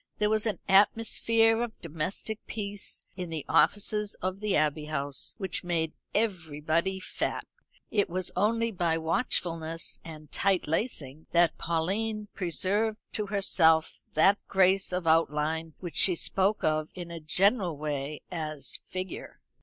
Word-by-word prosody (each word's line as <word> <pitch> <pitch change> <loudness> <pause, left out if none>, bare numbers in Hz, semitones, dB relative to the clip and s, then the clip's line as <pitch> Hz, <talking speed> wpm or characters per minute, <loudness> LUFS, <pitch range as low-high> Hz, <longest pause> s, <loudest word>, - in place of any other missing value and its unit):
There 210 0 +1
was 220 +1 +2
an 215 - -1
atmosphere 225 +3 +4
of 235 -2 -4
domestic 170 +7 -3
peace 205 -2 -3
in 180 -2 -4
the 160 -3 -4
offices 205 +6 +2
of 185 +1 -3
the 210 -2 0
Abbey 150 0 +1
House 145 -2 -2
which 190 -3 -1
made 165 -3 -1 0.2
everybody 170 -3 0
fat. - - -3 0.5
It 205 -2 +1
was 185 +1 -2
only 230 +4 +2
by 170 -4 0
watchfulness 165 -1 -1
and 155 -2 -11
tight 195 -2 +1
lacing 155 - -2
that 170 -1 +3
Pauline 205 +6 -1
preserved 200 +4 0 0.2
to 210 -1 -2
herself 165 -5 +3
that 195 +6 +5
grace 190 0 +3
of 180 -1 -2
outline 160 0 +1
which 175 -3 -6
she 185 - +4
spoke 195 +5 +1
of 155 0 +1
in 175 -2 -7
a 170 - -6
general 180 - +2
way 145 0 -4
as 155 -4 -1
"figure." 185 -1 -6
180 Hz, 140 wpm, -29 LUFS, 160-205 Hz, 0.5 s, that